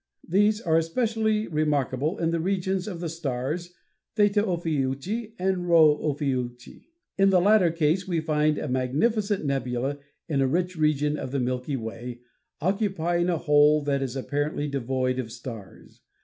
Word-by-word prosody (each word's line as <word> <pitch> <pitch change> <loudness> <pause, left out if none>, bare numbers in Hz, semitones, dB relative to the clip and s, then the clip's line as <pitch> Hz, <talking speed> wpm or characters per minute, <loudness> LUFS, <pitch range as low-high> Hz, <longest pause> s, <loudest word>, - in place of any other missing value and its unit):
These 205 +4 +3
are 165 -4 +3
especially 220 +4 0
remarkable 150 0 0
in 165 -1 0
the 170 - 0
regions 190 +2 -1
of 180 -5 -5
the 170 - -2
stars 160 +3 -4 0.4
Theta 205 -1 +3
Ophiuchi 170 - -2
and 180 -1 -1
Rho 160 -3 +7
Ophiuchi. 130 -5 -3 0.3
In 195 0 +5
the 185 -2 +5
latter 200 -1 +5
case 165 +3 0
we 170 -3 0
find 155 -1 +1
a - - -3
magnificent 195 - 0
nebula 135 0 -2 0.3
in 140 -5 0
a 135 - +3
rich 180 +5 -1
region 150 -1 +1
of - - -5
the 140 +1 -2
Milky 125 +3 -2
Way 120 +1 -6 0.4
occupying 175 -2 0
a 170 - +1
hole 150 -1 +4
that 140 -1 0
is 135 -1 -3
apparently 145 +2 -2
devoid 130 -1 -1
of 115 -3 -4
stars. 115 -5 -10
155 Hz, 150 wpm, -26 LUFS, 135-180 Hz, 0.4 s, Rho